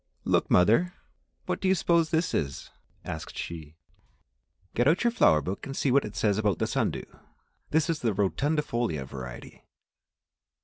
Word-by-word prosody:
"Look, - - +1
mother, 115 - +4 0.5
what - - -2
do 190 - +1
you 190 - +4
suppose 170 -2 +2
this 165 +1 0
is?" 70 -2 -3 0.3
asked 80 - -6
she. 80 -2 -7 1.0
"Get 120 +3 +2
out 165 +8 +3
your 235 - +3
flower 80 - +4
book 95 +6 -4
and 135 - -6
see 135 - +1
what 140 +2 +3
it 105 0 -8
says 105 -2 +1
about 105 -5 +1
the - - 0
sun - - 0
dew; - - -6 0.6
this 160 +1 +2
is 165 -2 -1
the 115 - +1
rotundifolia 120 - -1
variety." 65 -2 -9
115 Hz, 165 wpm, -27 LUFS, -, 1.0 s, mother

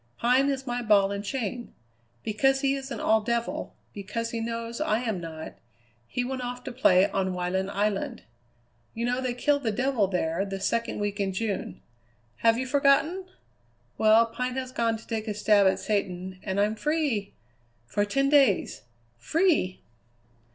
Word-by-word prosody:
Pine 255 +4 +3
is 270 -1 -2
my 245 -1 -2
ball 205 -3 +4
and 200 0 -3
chain. 240 +1 -4 0.5
Because 270 +5 +2
he 275 -1 +2
isn't 270 -3 -5
all 220 0 +3
devil, 235 +2 -2 0.2
because 220 +3 -4
he 230 - -3
knows 230 +2 -4
I 240 -7 +1
am 220 -7 -2
not, 160 -1 -8 0.5
he 245 - -2
went 260 +1 -3
off 245 0 -5
to - - -5
play 200 -7 +4
on 190 -1 -1
Wyland 185 +2 -1
Island. 205 0 -1 0.7
You 230 +1 -2
know 250 +1 0
they 250 -2 -2
kill 285 +3 +2
the 235 -5 -1
devil 245 -2 +1
there 180 -1 -1
the 195 -1 -5
second 230 +4 -1
week 205 0 -2
in 195 -1 0
June. 205 0 -3 0.5
Have 230 0 +3
you 260 - -2
forgotten? 285 +7 +2 0.7
Well, 220 +1 +6
Pine 250 +2 -4
has 260 -1 -4
gone 230 -3 0
to 225 - -15
take 225 -1 -3
a 210 - -2
stab 205 -1 +4
at 190 - +2
satan, 185 -3 -2
and 190 0 -2
I'm 210 +1 +2
free 285 -6 -1 0.5
for 205 +12 0
ten 275 +7 +1
days. 275 -9 +3 0.4
Free!" 305 - +1
230 Hz, 165 wpm, -27 LUFS, 200-255 Hz, 0.7 s, Well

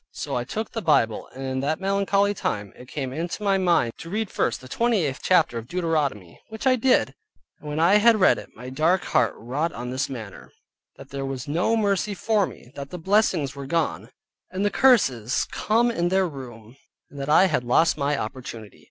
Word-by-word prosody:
So - - -4
I 120 0 -2
took 220 - -4
the 225 - -4
Bible, 130 - +2
and 135 - -7
in 130 0 -2
that 150 +4 -1
melancholy 200 +1 +1
time, 105 - -3
it 125 - -13
came 130 -2 -4
into 170 +7 -4
my 195 -1 +2
mind 170 -11 +2
to 165 - -8
read 215 +2 -2
first - - 0
the 130 - -12
28th 185 - 0
chapter 160 -10 +2
of 115 - -11
Deuteronomy, 150 - -2
which 220 +3 -7
I 260 -1 +5
did, 255 +1 +2 0.5
and 150 - -9
when 150 +1 -3
I 175 +5 +5
had 225 +1 +5
read 190 - +4
it, - - -11
my 125 +3 -9
dark 165 +7 +2
heart 115 - +1
wrought 140 +9 -2
on 125 +1 -6
this 130 +2 -2
manner: 110 -7 -9 0.4
that - - -13
there 135 0 -4
was 135 -1 -5
no 175 +10 +1
mercy 205 -1 0
for 210 0 +1
me, 120 - -13
that 140 -1 -7
the 180 - -6
blessings 175 -6 +1
were 140 -1 -7
gone, 165 +1 -1 0.4
and 190 +2 -2
the 205 - +1
curses 135 - +3
come 235 +3 +1
in 175 -6 0
their 190 0 +2
room, 125 -5 -10 0.3
and 140 - -10
that 140 +1 -4
I 160 +5 +6
had 180 - 0
lost 140 +7 +3
my 145 0 0
opportunity. 115 -5 -7
155 Hz, 205 wpm, -24 LUFS, 130-195 Hz, 0.5 s, I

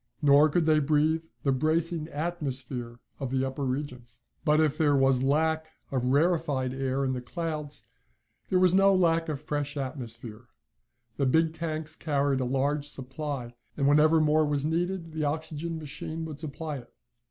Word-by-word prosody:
Nor 145 +1 +6
could 165 +2 +1
they 155 -1 +4
breathe 155 +2 +2 0.2
the 140 - +2
bracing 155 +3 0
atmosphere 135 -7 -4 0.2
of 135 -3 -3
the 130 +1 0
upper 135 +2 -4
regions. 125 -3 -4 0.2
But 150 -1 +3
if 155 -2 +2
there 150 -2 +3
was 135 -2 +3
lack 160 +3 +1 0.2
of 130 -2 0
the 125 - -1
rarefied 145 -3 +1
air 135 0 -1
of 130 -1 0
the 125 - -3
clouds, 150 +1 -4 0.6
there 185 - +3
was 185 -1 +4
no 195 +1 +5
lack 165 -2 +2
of 145 -3 -2
fresh 145 0 -3
atmosphere. 120 -4 -6 0.7
The 140 - +1
big 160 +4 +3
tanks 160 -1 -4
carried 140 -4 0
a 130 - 0
large 140 +3 0
supply, 135 -2 -5 0.2
and 140 -1 +2
whenever 155 +2 +5
more 155 0 +3
was 145 -1 0
needed 170 +1 -1
the 155 -1 -2
oxygen 160 +2 -3
machine 160 +2 -5
would 155 -3 -7
supply 155 0 -5
it. 120 -2 -12
150 Hz, 165 wpm, -28 LUFS, 135-160 Hz, 0.7 s, Nor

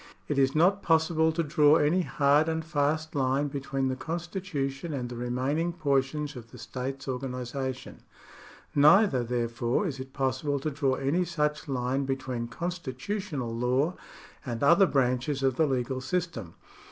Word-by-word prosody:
It 145 -2 0
is 135 +1 +2
not 185 +5 +4
possible 160 0 +3
to 165 +1 -1
draw 150 0 +4
any 165 +5 +3
hard 150 -1 +3
and 160 0 -2
fast 155 0 0
line 140 0 +1
between 135 -1 -2
the 130 - -1
constitution 165 -2 -4
and 125 -3 -3
the 120 - -7
remaining 130 +8 -1
portions 145 -1 0
of 115 -2 -10
the 125 - -13
state's 130 +3 -5
organi 125 -1 -3
sation; 130 +1 -5 0.8
neither, 150 - +5
therefore, 120 - -1
is 140 -7 -3
it 130 0 -7
possible 135 +2 -1
to 155 - -2
draw 135 -2 +1
any 145 +8 +1
such 150 -4 -1
line 130 0 -1
between 130 -3 -3
constitutional 165 - -4
law 130 +8 +1 0.5
and 120 -1 -4
other 170 +7 +6
branches 130 0 0
of 135 -2 +2
the 160 - +3
legal 130 -1 -1
system. 130 - -3
140 Hz, 155 wpm, -28 LUFS, 130-160 Hz, 0.8 s, other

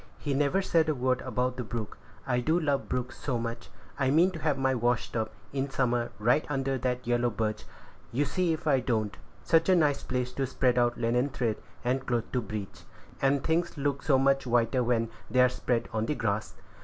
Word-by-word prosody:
He 145 - -2
never 145 +8 +2
said 165 -4 +2
a 155 - +1
word 130 0 +1
about 125 0 -1
the 125 - -2
brook. 110 -1 -5 0.3
I 125 -2 +1
do 160 +7 +2
love 145 -4 0
brooks 125 -1 -3
so 130 -4 -1
much! 115 0 -5 0.3
I 130 -2 +2
mean 165 +7 +4
to 170 - -7
have 150 -3 0
my 135 0 +2
wash 120 -1 0
tub, 110 -2 -1 0.2
in 135 0 -1
summer, 120 -3 0
right 120 +8 +3
under 135 -2 -1
that 125 0 -2
yellow 120 0 +2
birch; 110 -1 -2 0.5
you 140 +5 +1
see 175 +4 0
if 160 - -3
I 140 -4 +4
don't. 110 -4 -1 0.3
Such 165 +2 +3
a 185 - +6
nice 150 -5 +2
place 125 0 -2
to 135 -1 -1
spread 125 -1 +2
out 120 0 +2
linen 125 +4 +1
thread 120 -6 -1 0.3
and 130 +2 +1
cloth 120 -3 -2
to 125 - 0
bleach; 100 -4 -6 0.4
and 135 0 +2
things 165 0 0
look 140 -1 -1
so 140 -4 +3
much 135 0 +2
whiter 120 +1 +2
when 115 -1 +1 0.2
they 130 - +1
are 125 - +6
spread 120 -2 -1
on 110 0 -1
the 150 - 0
grass! 110 -3 -2
125 Hz, 210 wpm, -29 LUFS, 120-140 Hz, 0.5 s, a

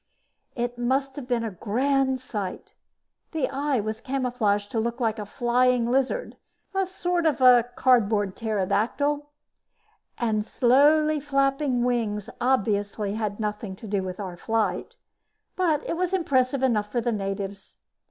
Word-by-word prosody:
It 240 0 -3
must 265 +2 0
have 270 -4 -6
been 240 -2 0
a 225 - -3
grand 260 +7 0
sight. 210 -6 -6 0.6
The 315 -4 0
eye 275 -1 0
was 215 +1 -4
camouflaged 245 -6 -1
to 225 - 0
look 235 +2 -2
like 225 -2 0
a 210 - -5
flying 245 +1 +2
lizard, 270 - 0 0.5
sort 355 -2 0
of 300 - +1
a 245 -2 +6
cardboard 210 -6 +3
pterodactyl, 230 +8 0 0.9
and 220 -3 0
the - - -1
slowly 300 +5 +4
flapping 275 -2 +1
wings 225 -5 -1
obviously 205 -4 0
had 215 -1 -3
nothing 210 -2 -3
to 220 - -10
do 200 -1 0
with 185 0 -6
our 185 -3 -5
flight. 225 +3 -1 0.6
But 325 -5 +1
it - - -1
was 365 +2 -1
impressive 265 -6 +1
enough 210 -5 +1
for 240 - 0
the 235 +1 0
natives. 195 -1 -5
240 Hz, 145 wpm, -25 LUFS, 210-270 Hz, 0.9 s, a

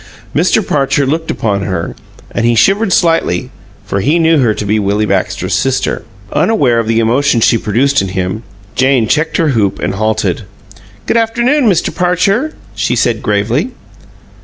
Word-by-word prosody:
Mr. 185 +6 +2
Parcher 140 0 +1
looked 160 +4 -2
upon 100 -3 -1
her, 90 -4 -3 0.4
and - - -2
he 120 0 +3
shivered 195 - +2
slightly; 165 -7 +1 0.3
for 100 -1 -2
he 145 - +2
knew 165 -2 +3
her 120 -5 +3
to 105 - -4
be 105 +2 +1
Willie 105 +1 0
Baxter's 100 -3 -1
sister. - - 0 0.3
Unaware 145 - +2
of 115 - -2
the 115 0 +1
emotion 120 +3 +2
she 115 - +3
produced 120 +5 +1
in 95 - -2
him, 95 +3 -3 0.3
Jane 130 -3 +2
checked 155 +6 0
her 160 -2 +2
hoop 110 -7 0
and - - -2
halted. 110 -2 -1 0.7
"G'd - - +2
afternoon, 240 +3 +2
Mister 175 -4 +1
Parcher," 195 - 0 0.2
she - - -1
said, 120 -2 0
gravely. 115 - -1
125 Hz, 160 wpm, -13 LUFS, 105-165 Hz, 0.7 s, he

